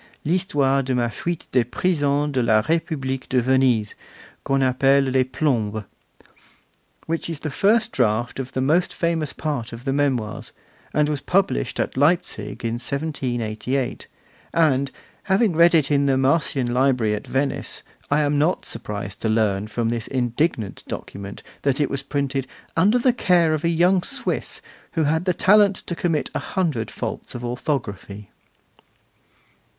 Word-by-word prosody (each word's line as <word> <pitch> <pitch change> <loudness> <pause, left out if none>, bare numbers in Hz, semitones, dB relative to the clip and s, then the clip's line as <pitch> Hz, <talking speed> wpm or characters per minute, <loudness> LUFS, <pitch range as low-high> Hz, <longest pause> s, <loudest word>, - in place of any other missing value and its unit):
L'Histoire 145 -6 +2
de 130 -1 -1
ma 120 -1 +1
Fuite 170 +9 -4
des 125 -2 +3
Prisons 145 +2 0
de 130 -2 +1
la 110 -2 +4
Republique 135 -2 -2
de 130 - +3
Venise, 125 -4 +2 0.5
qu'on 135 0 +1
appelle 135 +2 +3
les 130 0 +3
Plombs', 120 -6 -1 1.2
which 165 +1 -3
is 160 -3 -5
the 155 - -3
first 220 - +2
draft 115 +4 0
of 130 -1 -5
the 130 - -1
most 160 +7 +2
famous 165 -4 0
part 140 -7 -3
of 115 +2 -9
the 135 - 0
Memoirs, 130 -7 -1 0.4
was 150 -1 +1
published 180 - 0
at - - -1
Leipzig 125 - +1
in 115 +1 -1
1788; 130 -3 -2 0.5
and, 140 -4 +3 0.4
having 195 -1 +2
read 170 +1 +6
it 150 -3 +2
in 140 -1 +3
the 135 -1 +3
Marcian 135 -3 +1
Library 125 -4 +2
at 105 0 -5
Venice, 135 +1 -2 0.3
I 145 +1 +3
am 145 0 +1
not 165 +5 +1
surprised 105 -3 -4
to 110 - 0
learn 105 -2 +1
from 115 +1 -1
this 115 -2 -3
indignant 120 - -1
document 100 0 -7 0.2
that 140 0 +1
it 145 - +1
was 140 - -1
printed 135 -1 -2 0.3
'under 200 +8 +4
the 245 0 +3
care 175 -8 +3
of 155 - -2
a 170 - +2
young 175 +3 +3
Swiss, - - -2 0.3
who 165 - +1
had 160 +4 +1
the 180 - +2
talent 205 +1 +5
to 175 - -3
commit 165 -3 -1
a - - -1
hundred 155 - -2
faults - - -5
of 120 0 -5
orthography. 105 - -4
135 Hz, 155 wpm, -22 LUFS, 120-160 Hz, 1.2 s, read